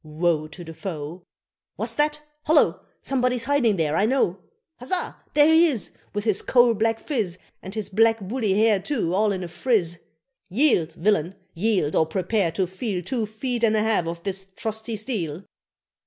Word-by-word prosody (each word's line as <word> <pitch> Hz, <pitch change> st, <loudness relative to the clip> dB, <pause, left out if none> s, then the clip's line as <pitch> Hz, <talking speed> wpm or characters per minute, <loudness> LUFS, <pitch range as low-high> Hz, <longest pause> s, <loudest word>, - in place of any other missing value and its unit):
Woe 155 Hz, 0 st, 0 dB
to 155 Hz, +3 st, -10 dB
the 165 Hz, -1 st, -9 dB
foe! 165 Hz, -1 st, -6 dB, 0.5 s
"What's -, -, -1 dB
that? 300 Hz, 0 st, 0 dB, 0.3 s
Holloa! 310 Hz, -1 st, +4 dB, 0.2 s
Somebody's 250 Hz, -2 st, 0 dB
hiding 260 Hz, -5 st, +2 dB
there, 155 Hz, -3 st, 0 dB
I 205 Hz, -, +3 dB
know. 225 Hz, -7 st, +1 dB, 0.4 s
Huzzah! 290 Hz, +9 st, -2 dB, 0.2 s
there 300 Hz, +2 st, +6 dB
he 335 Hz, +2 st, +6 dB
is, 240 Hz, -, -2 dB, 0.2 s
With 205 Hz, -1 st, -3 dB
his 210 Hz, -3 st, +1 dB
coal 240 Hz, -2 st, +4 dB
black 225 Hz, +1 st, 0 dB
phiz, 215 Hz, -, -2 dB, 0.2 s
And 190 Hz, +3 st, -8 dB
his 215 Hz, -3 st, -2 dB
black 225 Hz, +3 st, +3 dB
woolly 210 Hz, +1 st, -1 dB
hair 215 Hz, 0 st, +4 dB
too 205 Hz, -, -1 dB
all 210 Hz, +2 st, +2 dB
in 190 Hz, -2 st, -3 dB
a -, -, -4 dB
friz: 175 Hz, -2 st, 0 dB, 0.5 s
Yield, 190 Hz, -, +2 dB
villain! 185 Hz, -1 st, +1 dB, 0.2 s
yield, 180 Hz, -5 st, +1 dB
or 160 Hz, -, +3 dB
prepare 185 Hz, +1 st, 0 dB
to 185 Hz, +2 st, +1 dB
feel 185 Hz, 0 st, -4 dB
Two 230 Hz, +2 st, -2 dB
feet 235 Hz, +3 st, -3 dB
and 220 Hz, -1 st, +4 dB
a 215 Hz, -, +2 dB
half 215 Hz, -6 st, +1 dB
of 170 Hz, 0 st, -5 dB
this 195 Hz, -1 st, -4 dB
trusty 220 Hz, 0 st, -3 dB
steel!" 195 Hz, -, -4 dB
210 Hz, 175 wpm, -24 LUFS, 175-235 Hz, 0.5 s, there